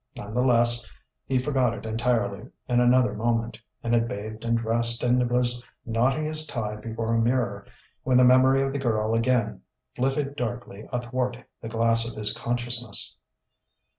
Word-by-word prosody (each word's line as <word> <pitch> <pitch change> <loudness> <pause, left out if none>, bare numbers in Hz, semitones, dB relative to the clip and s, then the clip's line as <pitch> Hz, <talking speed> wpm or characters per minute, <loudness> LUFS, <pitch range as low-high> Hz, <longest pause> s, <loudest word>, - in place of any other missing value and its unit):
None 105 +1 -8
the 125 - +1
less 120 -2 +3 0.4
he 130 - +1
forgot 125 -3 +1
it - - -9
entirely 115 -1 -1 0.2
in 120 -1 +2
another 125 -2 +4
moment, 115 +1 -1 0.2
and 115 - -1
had 115 0 +3
bathed 110 +1 -6
and 115 0 +1
dressed 115 +1 +1
and 125 0 +2
was 120 0 +1 0.2
knotting 125 +6 +1
his 155 0 -2
tie 110 -6 -3
before 115 +1 -3
a 115 - +2
mirror 115 -4 0 0.3
when 130 -1 +2
the 125 - +6
memory 130 +2 +5
of 135 0 -2
the 140 - -2
girl 110 -4 0
again 115 -1 +1 0.3
flitted 135 +2 -1
darkly 120 -4 -5
athwart 125 0 -2 0.2
the - - -6
glass 115 0 +1
of 120 - -10
his 105 0 -1
consciousness. 120 -1 -3
120 Hz, 165 wpm, -26 LUFS, 115-125 Hz, 0.4 s, the